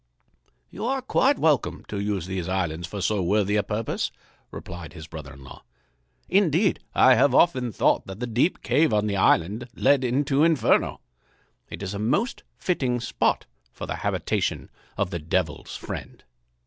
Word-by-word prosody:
"You - - -7
are 265 0 -1
quite 270 +1 +2
welcome 150 -5 +1
to 100 - -3
use 100 -4 -2
these 95 -2 -4
islands 85 -3 -2
for 100 +2 -6
so 100 +2 +1
worthy 100 +3 +1
a 105 - +3
purpose," 105 +2 -2 0.4
replied 85 -3 -9
his 80 -2 -9
brother 75 -4 -9
in 70 +1 -14
law. - - -12 0.6
"Indeed, 185 0 +3 0.2
I 130 - +7
have 130 +2 +4
often 130 -9 +3
thought - - +1
that 95 +1 -8
the 125 - -2
deep 125 +9 0
cave 150 -7 +3
on 105 0 +2
the 100 -1 -1
island 100 +6 +2
led 140 -2 +3
into 135 +3 +2
Inferno. 165 -3 +2 0.7
It - - -7
is 95 +1 -4
a 100 - -4
most 195 - 0 0.2
fitting 130 -9 0
spot 115 - 0 0.3
for - - -7
the - - -4
habitation - - -2 0.3
of 90 - -1
the 85 - -3
Devil's 80 0 -2
friend." - - -7
105 Hz, 165 wpm, -25 LUFS, 95-140 Hz, 0.7 s, I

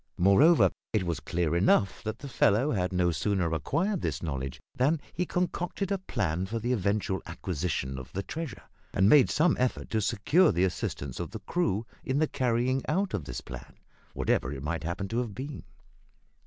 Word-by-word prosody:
Moreover, 100 - +6 0.2
it 105 -4 +2
was 85 -2 -2
clear 85 -1 -1
enough 95 +1 +3
that 110 +1 -4
the 140 - -8
fellow 125 +2 +3
had 90 -3 0
no 90 -1 +2
sooner 85 +1 0
acquired 170 - 0
this 80 -1 -2
knowledge 65 -4 -4 0.2
than 145 +6 +2
he 180 +1 -1
concocted 180 +2 -2
a 195 - +1
plan 95 - -2
for 115 +4 -3
the 120 +2 -2
eventual 100 -2 0
acquisition 80 -6 -3
of 65 - -10
the 100 - -3
treasure, 160 -6 -6 0.3
and 95 +1 +4
made 140 +3 +7
some 160 +2 +3
effort 125 0 -1
to 110 - +1
secure 145 - +3
the 85 +2 +1
assistance 70 -7 -2
of - - -3
the - - -7
crew 115 - 0 0.2
in 130 - -1
the 155 +1 +3
carrying 130 0 +1
out 190 +5 0
of 90 -9 -2
this - - -5
plan, 60 0 -10 0.4
whatever 65 - +1
it 70 -2 -6
might 80 +1 -2
happen 85 +4 -3
to 115 - 0
have 115 -5 -3
been. 140 +2 -6
100 Hz, 185 wpm, -29 LUFS, 85-135 Hz, 0.4 s, made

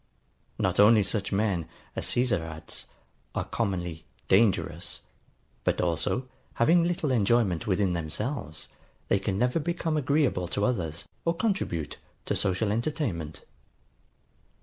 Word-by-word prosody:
Not - - 0
only 105 +1 +7
such 100 0 -2
men, 95 -5 +1 0.3
as - - -2
Caesar 120 -7 +2
adds, 80 -1 -7 0.5
are - - 0
commonly 90 -7 -2 0.2
DANGEROUS, 95 -4 +2 0.6
but - - +1
also, 90 +9 0 0.3
having 165 +9 +5
little 170 -4 0
enjoyment 110 -6 +2
within 95 -2 +2
themselves, 85 - -3 0.4
they 100 - +4
can 95 -1 -1
never 125 +8 +2
become 165 0 -1
agreeable 140 - +2
to 100 +4 0
others, 85 -10 -2 0.2
or 170 0 +1
contribute 175 - -1 0.3
to - - 0
social 100 +2 +1
entertainment. 110 - -2
100 Hz, 120 wpm, -28 LUFS, 85-125 Hz, 0.6 s, only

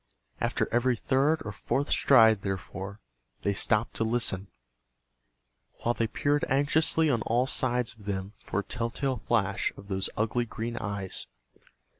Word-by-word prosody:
After - - 0
every 120 0 +2
third 140 +6 +2
or 105 - -3
fourth 135 +7 -2
stride, 110 -6 +6
therefore, 95 +1 -5 0.4
they 100 - +1
stopped 105 +3 +1
to - - +1
listen, 110 -4 0 1.4
while 120 - +2
they 115 -1 0
peered 145 +6 0
anxiously 155 +4 +3
on 115 -4 +1
all 120 +4 +1
sides 125 -2 0
of 105 -3 -16
them 95 0 -3
for 100 - -2
a - - -13
tell 115 +3 -2
tale 135 +1 -2
flash 100 -3 0
of 100 - -12
those 95 -1 0
ugly 115 +3 0
green 115 +1 -5
eyes. 100 -2 -3
115 Hz, 150 wpm, -28 LUFS, 100-130 Hz, 1.4 s, stride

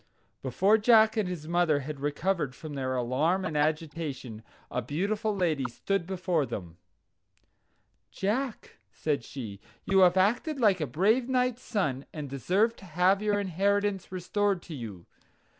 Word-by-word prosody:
Before 190 - +3
Jack 220 0 +5
and 210 -5 0
his 160 -4 -6
mother 170 -4 +2
had 145 +1 -6
recovered 150 0 -1
from 155 -2 -8
their 130 -2 -2
alarm 145 +10 +1
and 155 - -3
agitation, 150 -6 -2 0.3
a 125 - -1
beautiful 200 - -1
lady 160 -8 0
stood 175 +9 -2
before 180 -4 0
them. 85 -4 -7 1.3
"Jack," 225 +5 -3
said 145 +5 -1
she, 110 -8 -7 0.3
"you 195 -1 +3
have 180 0 +6
acted 245 - +2
like 200 -7 +3
a 155 - 0
brave 220 - +2
knight's 250 -1 +1
son, 145 - -2
and 150 -3 -6
deserve 195 - +1
to 195 - -13
have 180 +4 +2
your 210 -1 +1
inheritance 200 +1 0
restored 190 +1 0
to 170 - -9
you. 110 - -7
180 Hz, 145 wpm, -29 LUFS, 145-205 Hz, 1.3 s, have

